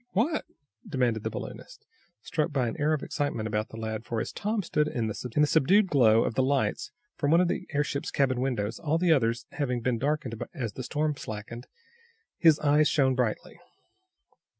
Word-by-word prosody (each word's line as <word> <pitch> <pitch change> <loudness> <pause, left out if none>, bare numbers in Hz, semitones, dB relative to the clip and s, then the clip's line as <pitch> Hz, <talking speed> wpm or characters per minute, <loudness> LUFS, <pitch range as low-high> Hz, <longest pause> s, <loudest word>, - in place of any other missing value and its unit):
"What?" 285 - +1 0.4
demanded 120 -4 0
the - - -2
balloonist, - - -8 0.4
struck 160 -1 -1
by 130 -4 0
an 115 - -3
air 150 +1 +2
of 150 - -2
excitement 145 -7 -2
about 110 0 -2
the 110 - -10
lad, 110 -1 -4
for, 115 -1 -3
as - - -3
Tom 210 0 -2
stood 150 -3 +1
in 120 -6 -2
the 110 - -2
subdued 150 - +2
glow 115 -6 +5
of - - -1
the 130 - +1
lights 135 +1 0 0.3
from 145 - 0
one 165 +3 +5
of 180 - +3
the - - -3
airship's 140 -1 -1
cabin 130 -3 +1
windows, 115 -5 -2
all 160 +1 0
the 170 -1 +4
others 115 -4 0
having 125 -5 -2
been 120 -1 0
darkened 140 -4 -2
as 120 -8 -3
the - - -6
storm 150 +4 -1
slackened, 110 +3 -7 0.7
his, 160 -3 +6
eyes 150 +1 +4
shone 135 -3 +3
brightly. 125 -4 -2
135 Hz, 185 wpm, -28 LUFS, 115-150 Hz, 0.7 s, his